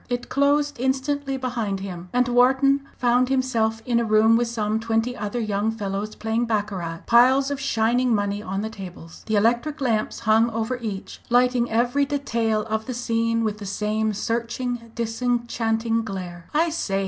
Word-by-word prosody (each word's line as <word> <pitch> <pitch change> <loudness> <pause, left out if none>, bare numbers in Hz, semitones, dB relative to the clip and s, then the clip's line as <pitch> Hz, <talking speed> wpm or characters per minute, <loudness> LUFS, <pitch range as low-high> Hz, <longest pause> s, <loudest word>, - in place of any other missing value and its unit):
It 245 -1 -3
closed 285 0 +1
instantly 270 +1 -1
behind 235 -6 -2
him, 180 -2 -7
and 250 0 +2
Wharton 265 +3 +4 0.2
found 250 +1 +2
himself 230 -4 0
in 240 -2 +2
a - - +1
room 220 +1 +4
with 240 +1 +2
some 220 -2 -1
twenty 225 +2 0
other 210 +2 -3
young 210 -1 0
fellows 210 -1 -4
playing 225 +2 -1
baccarat, 200 -7 -2
piles 260 +4 +5
of 285 - -2
shining 245 -1 +1
money 205 0 -1
on 195 -1 -3
the 220 - -3
tables, 180 -5 -10
the 220 - +1
electric 240 +9 +1
lamps 230 -6 -1
hung 225 +1 +4
over 225 +2 -2
each, 210 -5 -6
lighting 245 0 +3
every 245 +5 +2
detail 230 -7 0
of 220 0 -3
the 255 - -3
scene 230 -1 0
with 215 -1 -2
the 205 - -7
same 215 +2 -1
searching 235 +2 -3
disenchanting 230 -1 -1
glare. 180 -4 -6
"I 325 +3 +2
say!" 195 -11 -1
230 Hz, 165 wpm, -23 LUFS, 215-250 Hz, 0.2 s, piles